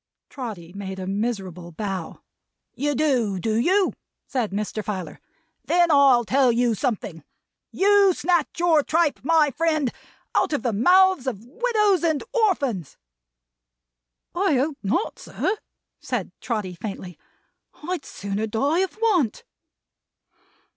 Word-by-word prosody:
Trotty 205 - -7
made 195 -1 -6
a 185 - -5
miserable 190 -4 -3
bow. 190 -1 -5 0.5
"You 290 +2 -1
do, 250 -10 +1
do 215 +4 -1
you?" 375 +9 +2 0.3
said 245 -6 -2
Mr. 210 +2 -3
Filer. 185 -7 -5 0.5
"Then 340 +4 +3
I'll 275 -5 +5
tell 260 +1 +3
you 235 0 +2
something. 205 - -3 0.5
You 400 0 +4
snatch 340 -1 0
your 335 -3 +4
tripe, 320 +1 +1
my 305 0 +3
friend, 310 -4 0 0.4
out - - +1
of 290 - -1
the 240 -3 0
mouths 365 - +4
of 225 -4 -4
widows 420 - +1
and 315 -3 +1
orphans." 280 - 0 1.4
"I 370 -4 +2
hope 275 +3 0
not, 240 - -1
sir," 395 - -2 0.4
said - - -3
Trotty, 210 -6 -3
faintly. 185 -1 -7 0.7
"I'd 360 -5 -2
sooner 200 +2 -4
die 280 +10 +1
of 380 +2 -1
want!" 390 - +1
260 Hz, 125 wpm, -24 LUFS, 205-340 Hz, 1.4 s, I'll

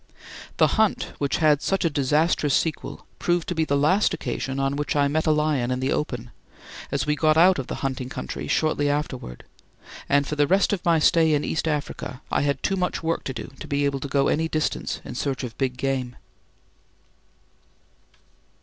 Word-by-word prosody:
The - - +6 0.2
hunt 220 - 0
which 140 -1 0
had 150 -2 +3
such 195 -2 0
a - - +4
disastrous 145 +1 +2
sequel 160 -2 -2
proved 175 -1 0
to - - 0
be 160 -2 0
the 140 -2 +1
last 185 +9 +3
occasion 135 0 -4
on 135 +1 0
which 145 +1 -2
I 145 -1 +3
met 155 +3 0
a - - +5
lion 150 -5 +1
in 130 0 -1
the 130 +1 -1
open, 120 -5 -3 0.6
as - - 0
we 150 0 +1
got 155 +1 +3
out 180 0 +6
of 130 - -4
the - - -4
hunting 130 -1 -3
country 65 - -5
shortly 150 -2 +1
afterwards 140 - -3 0.7
and 145 0 +3
for 150 - -3
the 145 -1 +2
rest 195 +5 +3
of 190 - -2
my 170 -1 +4
stay 160 0 +4
in 145 - 0
East 160 - -2
Africa 145 -4 -4
I - - +2
had 140 0 -1
too 195 - +1
much 180 -2 -2
work 165 +1 -1
to 135 - -3
do 115 +2 -7
to - - -8
be 145 0 0
able 140 -1 0
to 140 - -5
go 140 0 +2
any 160 +1 +1
distance 155 -1 -2
in - - -6
search 135 -1 -2
of 120 -3 -6
big 130 -2 -1
game. 130 -2 -2
145 Hz, 200 wpm, -24 LUFS, 135-160 Hz, 0.7 s, The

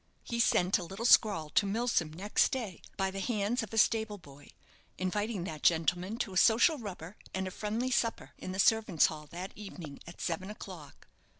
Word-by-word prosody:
He 235 - -4
sent 190 -4 +3
a - - -5
little 195 +6 -6
scrawl 195 -11 +5
to 200 - +3
Milsom 210 -6 0
next 195 +6 +1
day, 225 - -4 0.2
by 190 -1 0
the 195 - -5
hands 215 +2 0
of 220 - -7
a 225 - -5
stable 220 -1 +2
boy, 145 -5 -15 0.5
inviting 205 +1 -2
that 155 -4 -6
gentleman 180 +5 +2
to 200 -5 -3
a - - -2
social 240 - +5
rubber 195 -3 -8 0.2
and 190 0 -2
a - - -5
friendly 220 +6 -2
supper 235 -3 0
in 185 - -6
the 190 - -5
servants' 215 -5 +4
hall 150 -1 -3
that 180 +5 -7
evening 175 -8 -9
at 170 - -11
seven 175 +3 -3
o'clock. 185 -7 -10
195 Hz, 190 wpm, -31 LUFS, 175-220 Hz, 0.5 s, scrawl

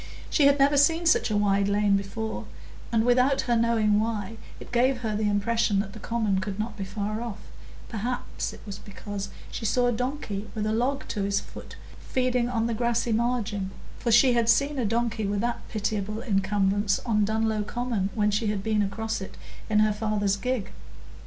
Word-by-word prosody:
She 290 -3 +5
had 280 0 +4
never 285 +1 +4
seen 325 +4 +4
such 325 - +4
a 210 - +1
wide 200 -1 +2
lane 205 0 +3
before, 210 +3 -3 0.5
and, 225 -1 +2
without 250 +2 +3
her 245 -2 +1
knowing 225 -2 +3
why, 220 -1 -2 0.2
it - - -11
gave 245 +1 +2
her 220 -3 -2
the 210 0 +1
impression 205 +1 +1
that 195 -1 -3
the - - -9
common 210 -3 0
could 195 0 -4
not 215 +1 -3
be 200 - -4
far 210 +3 -3
off; 230 -4 -5 0.5
perhaps 240 +3 -3
it - - -12
was 200 -2 -7
because 200 -1 -6 0.2
she - - -5
saw 245 +3 +2
a 245 - +3
donkey 220 -4 -3
with 215 -1 -1
a 215 - 0
log 260 +4 0
to 210 - -2
his 200 0 +1
foot - - -11 0.2
feeding 250 -2 0
on 230 -2 0
the 235 - 0
grassy 235 +1 0
margin, 220 -4 0 0.3
for 235 - 0
she 245 +3 +6
had 235 -1 +2
seen 280 +4 +3
a 245 - +1
donkey 225 -1 0
with 200 0 -1
that 240 0 -1
pitiable 210 0 -2
encumbrance 200 0 +1
on 215 -3 +2
Dunlow 220 0 0
Common 230 -3 -2
when 210 -1 +2
she 210 +2 0
had 205 -2 -1
been 215 -1 +1
across 220 +2 -2
it 190 - -8 0.3
in 210 -1 +4
her 215 0 +3
father's 210 -2 0
gig. 250 0 -2
220 Hz, 195 wpm, -26 LUFS, 205-240 Hz, 0.5 s, she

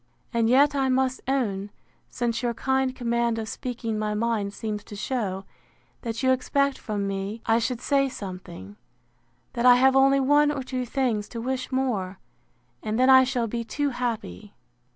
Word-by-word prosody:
And 230 -1 +2
yet 280 +4 +5
I 270 -2 +1
must 260 0 +1
own, 210 -7 -1 0.4
since 235 -1 -2
your 240 -2 -1
kind 265 +1 0
command 235 -1 0
of 220 -1 -4
speaking 230 -2 -4
my 210 0 -1
mind 215 -2 -1
seems 210 0 -5
to 205 - -9
shew, 200 -4 -3 0.6
that 230 +1 -4
you 260 - +4
expect 280 +2 +1
from 205 -2 -3
me 195 +3 -4
I 225 +1 +3
should 235 +1 -2
say 275 0 +2
something; 190 -2 -9 0.8
that 240 0 +2
I 245 - +9
have 265 +1 +4
only 275 +1 +5
one 290 +2 +4
or 280 -3 -2
two 255 -1 -4
things 235 -5 -1
to 235 - -6
wish 255 +3 -3
more, 220 -8 -1 0.6
and 215 0 -2
then 255 +1 +5
I 260 0 +8
shall 250 -2 -1
be 235 +1 -3
too 290 +5 -1
happy. 235 -4 -4
240 Hz, 175 wpm, -25 LUFS, 215-265 Hz, 0.8 s, I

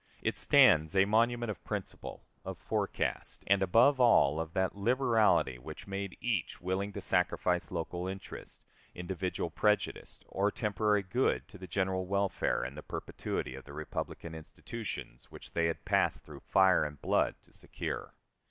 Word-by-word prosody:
It - - 0
stands 80 +4 +5
a 95 0 +6
monument 115 +2 +2
of 105 - -10
principle, - - -6 0.2
of - - -6
forecast, - - -2
and, 100 0 +3
above 115 +9 +5
all, 80 - +5
of 80 0 -4
that 95 0 0
liberality 110 - +2
which 75 +5 -9
made 100 -1 -5
each 110 -9 -2
willing 95 +3 -2
to 100 - -5
sacrifice 90 -1 +1
local 90 +1 -3
interest, 95 +1 -8 0.3
individual 90 -1 -3
prejudice, 105 +4 0
or 100 +2 +1
temporary 105 -1 +1
good 120 +8 0
to 105 - -13
the 95 - -8
general 95 -1 -1
welfare 100 0 0
and - - -5
the - - -7
perpetuity 65 - -4
of 65 - -10
the 70 - -11
republican 75 +2 -5
institutions 80 - -7
which - - -12
they 85 0 +1
had 80 - -4
passed - - +1
through - - -11
fire 95 -1 +4
and 75 -1 -5
blood - - +1
to - - -23
secure. - - -6
95 Hz, 155 wpm, -32 LUFS, 85-105 Hz, 0.3 s, a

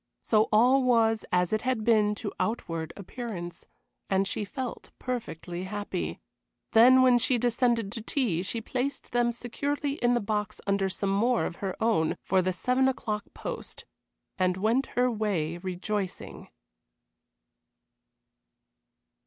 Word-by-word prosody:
So 215 -1 +3
all 250 +5 +5
was 230 -3 +3
as 180 +2 +2
it 215 - +1
had 255 -4 -1
been 215 -2 +3
to 205 -1 -5
outward 165 -8 -2
appearance, 200 -4 -7 0.4
and 195 0 +2
she 210 - -2
felt 255 +4 -6
perfectly 185 -8 -5
happy. 195 - -4 0.5
Then 255 +3 +7
when 250 -1 +5
she 245 +1 +2
descended 235 -3 +1
to 230 - -5
tea 220 - 0
she 225 +5 -4
placed 260 +4 -3
them 240 0 +2
securely 280 +4 -3
in 240 0 +4
the - - +2
box 210 -1 -2
under 200 -1 +1
some 195 +1 -2
more 230 +5 +2
of 170 - -5
her 195 -2 -3
own 220 -9 +1
for 190 0 +2
the 185 +1 0
seven 250 +9 +1
o'clock 215 -5 -2
post, - - -6 0.5
and 185 0 +2
went 225 +7 +1
her 250 0 +3
way 185 -7 -1
rejoicing. 185 +1 -4
220 Hz, 135 wpm, -28 LUFS, 190-245 Hz, 0.5 s, Then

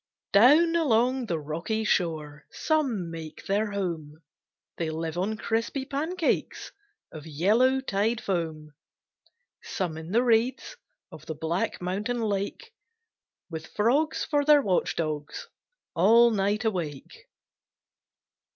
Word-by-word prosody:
Down 300 +11 +6
along 255 -4 +2
the 170 - -1
rocky 165 +9 -3
shore 155 -7 -1
Some 255 - -1
make 160 -2 -9
their 205 +2 0
home, 170 -7 -4 0.6
They 165 -2 -2
live 160 0 -4
on 200 +5 -1
crispy 230 +5 -2
pancakes 315 +5 -2 0.4
Of 155 0 -10
yellow 220 - +2
tide 220 -1 0
foam; 160 -6 -3 0.9
Some 175 -4 -4
in 160 +1 -9
the 230 +6 +2
reeds 235 +1 +1 0.4
Of - - -12
the 160 - -4
black 160 +4 -2
mountain 205 +7 -2
lake, 210 - -3 0.8
With 160 0 -6
frogs 270 +9 +1
for 290 -2 +1
their 295 -1 +5
watch 185 -5 0
dogs, 155 -3 -4 0.5
All 230 +7 +5
night 205 +2 0
awake. 165 -10 -4
200 Hz, 115 wpm, -27 LUFS, 165-245 Hz, 0.9 s, Down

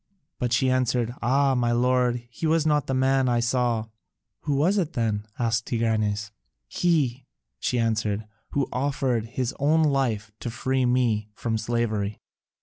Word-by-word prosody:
But 125 -1 -1
she 130 +2 +3
answered, 125 -2 +1
"Ah, 135 +3 +3
my 120 -2 +1
lord, 125 0 +2
he 160 - -3
was 160 0 +2
not 150 -3 +2
the 135 - 0
man 130 0 +2
I 120 -1 +2
saw." 120 -2 +1 0.6
"Who 145 - +1
was 180 +9 +3
it 175 -3 -2
then?" 110 -3 -1
asked 115 0 0
Tigranes. 110 -3 0 0.4
"He," 135 -7 0 0.3
she 125 - 0
answered, 110 -2 0 0.3
"who 140 -1 +1
offered 130 -4 0
his 125 +1 -2
own 155 +3 +3
life 125 -8 0
to 120 - -4
free 130 +2 0
me 115 -4 +1
from 115 -1 -2
slavery." 110 -3 -1
125 Hz, 150 wpm, -25 LUFS, 115-135 Hz, 0.6 s, she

